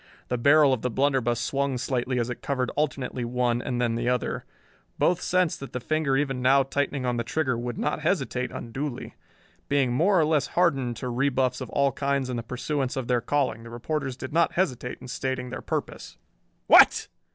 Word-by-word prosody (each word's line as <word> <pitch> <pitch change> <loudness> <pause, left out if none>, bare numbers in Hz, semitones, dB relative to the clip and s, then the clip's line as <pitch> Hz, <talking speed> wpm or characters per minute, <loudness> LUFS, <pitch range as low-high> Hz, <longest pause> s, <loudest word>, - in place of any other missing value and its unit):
The 125 - 0
barrel 145 +2 +5
of 125 - -2
the 125 - -1
blunderbuss 130 -2 +1
swung 135 +2 -1
slightly 125 0 -1
as 120 - 0
it 125 - -7
covered 130 -3 -1
alternately 135 -4 -2
one 120 0 0
and 125 -2 -3 0.2
the 120 +1 -1
other. 125 -1 -1 0.5
Both 175 - +2
sensed 180 -2 +1
that 135 - -9
the 125 - -2
finger 150 +1 0
even 135 -3 -1
now 135 +2 +5
tightening 140 0 -2
on 125 -1 0
the 115 - -1
trigger 130 +1 -1
would 120 0 -4
not - - -1
hesitate 125 +1 -1
unduly. 135 +3 -5 0.6
Being 135 -3 +2
more 180 +8 +3
or 155 - +4
less 150 -3 +1
hardened 135 -9 +2
to 125 - -4
rebuffs 130 0 0
of 130 - -5
all 140 -1 +2
kinds 140 0 -1
in - - -2
the 120 - -2
pursuance 130 +3 -3
of 130 -3 -3
their 125 -1 +2
calling, 135 -1 0
the 115 - -10
reporters 135 +2 -3
did 130 +1 -7
not 170 +1 +3
hesitate 130 -9 -1
in - - -10
stating 125 0 -3
their 130 - -5
purpose. - - -5 0.5
"What?" - - +7
130 Hz, 195 wpm, -26 LUFS, 125-140 Hz, 0.6 s, What